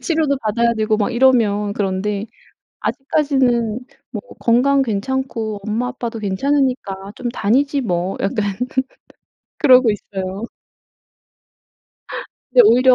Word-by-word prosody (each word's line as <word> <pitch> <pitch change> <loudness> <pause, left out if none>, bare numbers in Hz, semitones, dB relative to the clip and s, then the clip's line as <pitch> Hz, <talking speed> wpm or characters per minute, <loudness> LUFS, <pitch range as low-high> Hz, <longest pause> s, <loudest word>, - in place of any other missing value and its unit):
치료도 310 -4 +1
받아야 235 +2 +2
되고 215 0 +1
막 215 +3 0
이러면 225 -5 +3
그런데 200 +1 -2 0.5
'아직까지는 265 -6 0 0.3
뭐 - - -5 0.2
건강 270 +4 +3
괜찮고 225 -2 -2
엄마 225 +4 -1
아빠도 235 -2 -5
괜찮으니까 210 -2 -1
좀 250 - -3
다니지 275 +7 +1
뭐.' 180 -5 -1
약간 200 -1 -1 1.0
그러고 255 -5 +6
있어요. 195 -1 -5 2.1
근데 - - +7
오히려 255 +2 +6
230 Hz, 250 characters per minute, -19 LUFS, 205-265 Hz, 2.1 s, 근데